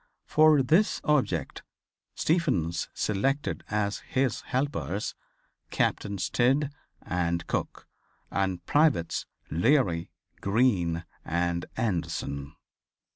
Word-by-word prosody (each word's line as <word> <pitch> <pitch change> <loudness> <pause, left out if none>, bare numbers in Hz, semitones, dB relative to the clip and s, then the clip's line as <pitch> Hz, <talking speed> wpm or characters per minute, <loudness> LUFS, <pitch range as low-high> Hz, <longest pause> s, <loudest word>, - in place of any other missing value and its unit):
For 155 -2 +5
this 165 +11 +3
object 150 -3 0 0.5
Stephens 90 - +1
selected 135 +8 -1
as 105 -1 0
his 130 -1 -1
helpers 130 -7 -1 0.6
Captains 100 -3 0
Tidd 135 +4 +2 0.3
and 85 -1 -1
Cook - - -3 0.4
and 95 -3 -1
privates 145 - +2 0.2
Leary, 90 - +2 0.3
Green 95 -6 +2 0.2
and 85 +1 -1
Anderson. 75 -8 -2
100 Hz, 80 wpm, -28 LUFS, 85-135 Hz, 0.6 s, For